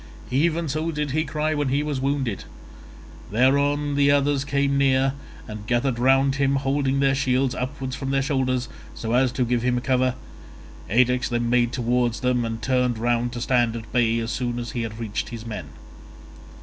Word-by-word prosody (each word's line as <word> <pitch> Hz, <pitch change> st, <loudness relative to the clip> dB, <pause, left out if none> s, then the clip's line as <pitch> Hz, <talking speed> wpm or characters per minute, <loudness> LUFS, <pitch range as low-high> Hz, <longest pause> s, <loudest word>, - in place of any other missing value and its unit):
Even 160 Hz, +5 st, +1 dB
so 155 Hz, +3 st, -2 dB
did 150 Hz, -2 st, -2 dB
he 155 Hz, +3 st, +1 dB
cry 155 Hz, +1 st, -1 dB
when 145 Hz, -2 st, -1 dB
he 140 Hz, +3 st, +1 dB
was 145 Hz, -3 st, -2 dB
wounded; 135 Hz, -6 st, -1 dB, 0.8 s
thereon 140 Hz, +6 st, +2 dB
the 140 Hz, 0 st, +3 dB
others 145 Hz, -1 st, +2 dB
came 140 Hz, 0 st, 0 dB
near, 135 Hz, -1 st, +3 dB, 0.3 s
and 105 Hz, -1 st, -8 dB
gathered 120 Hz, 0 st, 0 dB
round 135 Hz, +2 st, +3 dB
him, 140 Hz, 0 st, +2 dB
holding 135 Hz, 0 st, 0 dB
their 135 Hz, -1 st, +3 dB
shields 130 Hz, -1 st, +1 dB
upwards 130 Hz, 0 st, -4 dB
from 135 Hz, -, -4 dB
their 135 Hz, 0 st, +1 dB
shoulders 130 Hz, -2 st, 0 dB, 0.3 s
so 115 Hz, 0 st, -3 dB
as 125 Hz, 0 st, +3 dB
to 125 Hz, 0 st, 0 dB
give 120 Hz, 0 st, 0 dB
him 125 Hz, 0 st, +1 dB
cover. 130 Hz, 0 st, +1 dB, 0.7 s
Ajax 125 Hz, +3 st, +2 dB
then 120 Hz, -1 st, -1 dB
made 120 Hz, -1 st, +3 dB
towards 120 Hz, -1 st, 0 dB
them, 125 Hz, -1 st, +1 dB
and 115 Hz, -1 st, -5 dB
turned 125 Hz, -1 st, +1 dB
round 120 Hz, +1 st, 0 dB
to 120 Hz, -, -4 dB
stand 120 Hz, -2 st, +2 dB
at 115 Hz, -1 st, -8 dB
bay 115 Hz, -2 st, +2 dB
as 115 Hz, 0 st, -2 dB
soon 120 Hz, 0 st, -2 dB
as 120 Hz, -1 st, -4 dB
he 120 Hz, -, -3 dB
had 110 Hz, -1 st, -5 dB
reached 110 Hz, -3 st, -3 dB
his 115 Hz, -1 st, -8 dB
men. 110 Hz, -2 st, -5 dB
130 Hz, 185 wpm, -24 LUFS, 120-140 Hz, 0.8 s, the